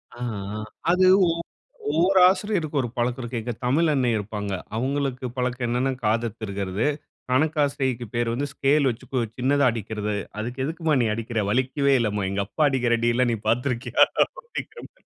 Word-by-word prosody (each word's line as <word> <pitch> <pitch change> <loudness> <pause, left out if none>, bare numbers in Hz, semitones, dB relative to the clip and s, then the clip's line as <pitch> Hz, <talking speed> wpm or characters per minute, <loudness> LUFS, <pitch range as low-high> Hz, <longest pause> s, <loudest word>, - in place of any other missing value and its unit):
ஆ, - - -14 0.4
ஆ. - - -4 0.3
அது 185 +1 +4 0.2
ஒ 165 - +3 0.6
ஒவ்வொரு 180 +5 +4
ஆசிரியருக்கும் 185 -7 -1
ஒரு 125 - -2
பழக்கம் 125 +2 0
இருக்கு. 120 -1 -3
எங்க 120 - -3
தமிழண்ணை 140 -1 +2
இருப்பாங்க. 105 -1 -4 0.2
அவங்களுக்கு 130 0 -1
பழக்கம் 125 -1 -1
என்னன்னா, 125 +3 +1
காதத் 115 +1 0
திருகுறது. 100 +1 -2 0.4
கணக்காசிரியைக்கு 140 -3 +1
பேரு 120 0 0
வந்து 140 +4 -1
ஸ்கேல் 140 0 +2
வச்சு 115 - -7
கு 130 - +1 0.2
சின்னதா 140 +3 +2
அடிக்கிறது. 105 -1 -3 0.3
"அதுக்கு 125 +4 -4
எதுக்கும்மா 160 +1 0
நீ 115 - +2
அடிக்கிற? 115 -1 -2
வலிக்கவே 135 +4 +2
இல்லைம்மா. 105 -3 0
எங்க 100 +1 -1
அப்பா 105 +10 0
அடிக்கிற 125 -3 +2
அடியில 120 +2 +2
நீ - - 0
பார்த்திருக்கிறாயா?" 125 +1 +2 0.3
அப்படிங்கிறமாரி. 480 +1 -9
125 Hz, 150 wpm, -24 LUFS, 115-145 Hz, 0.6 s, அது